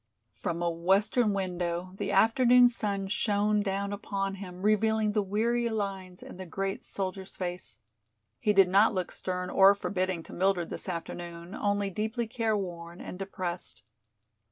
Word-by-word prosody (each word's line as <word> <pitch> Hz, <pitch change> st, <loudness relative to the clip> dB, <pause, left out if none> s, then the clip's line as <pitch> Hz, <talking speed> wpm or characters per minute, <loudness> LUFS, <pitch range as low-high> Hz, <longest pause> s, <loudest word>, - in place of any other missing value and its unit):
From 170 Hz, +1 st, -3 dB
a 170 Hz, -, +1 dB
western 195 Hz, +7 st, +2 dB
window 180 Hz, -2 st, -2 dB
the -, -, -2 dB
afternoon 245 Hz, +1 st, +6 dB
sun 200 Hz, -4 st, -2 dB
shone 210 Hz, +1 st, +1 dB
down 200 Hz, 0 st, -2 dB
upon 195 Hz, -1 st, -3 dB
him, 185 Hz, -1 st, -8 dB
revealing 215 Hz, 0 st, +3 dB
the 210 Hz, 0 st, +1 dB
weary 230 Hz, +4 st, 0 dB
lines 195 Hz, -4 st, -4 dB
in -, -, -10 dB
the 185 Hz, -1 st, -7 dB
great 195 Hz, +3 st, -3 dB
soldier's 190 Hz, 0 st, -5 dB
face. 180 Hz, -1 st, -5 dB, 0.6 s
He 210 Hz, -, +2 dB
did 195 Hz, -2 st, +6 dB
not 200 Hz, +3 st, +4 dB
look 185 Hz, -1 st, -2 dB
stern 180 Hz, 0 st, -4 dB
or 195 Hz, +1 st, +7 dB
forbidding 185 Hz, -4 st, -2 dB
to -, -, -12 dB
Mildred 185 Hz, -2 st, +1 dB
this -, -, -4 dB
afternoon, 170 Hz, +1 st, -6 dB
only 205 Hz, -2 st, 0 dB
deeply 220 Hz, +4 st, -2 dB
careworn 195 Hz, -8 st, -3 dB
and 180 Hz, -, -8 dB
depressed. 185 Hz, -, -5 dB
195 Hz, 150 wpm, -29 LUFS, 180-210 Hz, 0.6 s, or